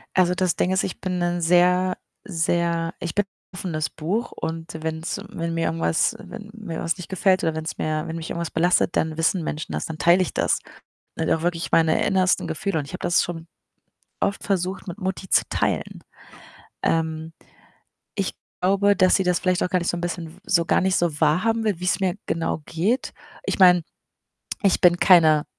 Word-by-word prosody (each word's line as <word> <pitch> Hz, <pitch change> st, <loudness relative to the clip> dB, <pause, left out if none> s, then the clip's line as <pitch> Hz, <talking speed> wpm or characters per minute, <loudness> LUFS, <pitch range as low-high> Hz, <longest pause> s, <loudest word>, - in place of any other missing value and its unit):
Also, 180 Hz, -1 st, +4 dB
das 180 Hz, -1 st, +1 dB
Ding 180 Hz, -, +1 dB
ist, 190 Hz, -, +2 dB
ich 185 Hz, -, -4 dB
bin 180 Hz, -2 st, -2 dB
’n 175 Hz, 0 st, 0 dB
sehr, 180 Hz, +2 st, +3 dB, 0.3 s
sehr 170 Hz, -2 st, 0 dB
ich 170 Hz, -, -4 dB
bin 205 Hz, -, +2 dB
’n -, -, -51 dB, 0.3 s
offenes 160 Hz, -4 st, -2 dB
Buch 195 Hz, +10 st, -3 dB
und 165 Hz, 0 st, -5 dB
wenn’s 160 Hz, +4 st, -3 dB
wenn 165 Hz, -5 st, -4 dB
mir 165 Hz, 0 st, 0 dB
irgendwas 165 Hz, 0 st, +1 dB
wenn 210 Hz, -2 st, -10 dB
mir 205 Hz, -8 st, -6 dB
was 165 Hz, -, -1 dB
nicht 180 Hz, -4 st, -9 dB
gefällt 190 Hz, 0 st, +2 dB
oder 160 Hz, -1 st, 0 dB
wenn’s 160 Hz, +1 st, -4 dB
mir 155 Hz, 0 st, -2 dB
wenn 160 Hz, -, -5 dB
mich 165 Hz, 0 st, -6 dB
irgendwas 170 Hz, -1 st, -3 dB
belastet, 175 Hz, +1 st, +2 dB
dann 160 Hz, -1 st, 0 dB
wissen 165 Hz, +2 st, +1 dB
Menschen 155 Hz, -, -4 dB
das, 75 Hz, -, -2 dB
dann 160 Hz, -, -6 dB
teile 175 Hz, +3 st, +4 dB
ich 185 Hz, -, -2 dB
das. -, -, +1 dB, 0.6 s
Und -, -, 0 dB
auch 160 Hz, -, +1 dB
wirklich 170 Hz, -1 st, -1 dB
meine 160 Hz, -1 st, +3 dB
innersten 190 Hz, -1 st, +2 dB
Gefühle, 195 Hz, +2 st, -2 dB
und 145 Hz, -, -4 dB
ich -, -, -11 dB
habe -, -, -6 dB
das 175 Hz, -1 st, +3 dB
schon 165 Hz, -1 st, -6 dB, 0.7 s
oft 200 Hz, -, -1 dB
versucht, 190 Hz, -1 st, -2 dB
mit 175 Hz, +1 st, -6 dB
Mutti 190 Hz, -1 st, -4 dB
zu -, -, +4 dB
teilen. -, -, -2 dB, 0.8 s
Ähm, 160 Hz, 0 st, -1 dB, 0.8 s
ich 195 Hz, -2 st, -1 dB, 0.3 s
glaube, 200 Hz, +2 st, +3 dB
dass 185 Hz, -2 st, +4 dB
sie 190 Hz, -, +2 dB
das 180 Hz, -1 st, +1 dB
vielleicht 185 Hz, -1 st, +1 dB
auch -, -, -1 dB
gar 180 Hz, -, +2 dB
nicht 175 Hz, -, -2 dB
so 175 Hz, -, -1 dB
’n -, -, -5 dB
bisschen 170 Hz, -1 st, -5 dB
so 170 Hz, -2 st, +2 dB
gar -, -, +2 dB
nicht 190 Hz, 0 st, +2 dB
so 165 Hz, -4 st, 0 dB
wahrhaben 225 Hz, +8 st, +2 dB
will, 205 Hz, -6 st, 0 dB
wie’s 180 Hz, +2 st, 0 dB
mir 190 Hz, -2 st, 0 dB
genau 165 Hz, -1 st, -2 dB
geht. 195 Hz, +10 st, -1 dB, 0.3 s
Ich -, -, -2 dB
meine, 180 Hz, -2 st, +7 dB, 0.8 s
ich 195 Hz, -3 st, +3 dB
bin 175 Hz, -1 st, +6 dB
keine 160 Hz, -5 st, +5 dB
175 Hz, 195 wpm, -23 LUFS, 165-185 Hz, 0.8 s, meine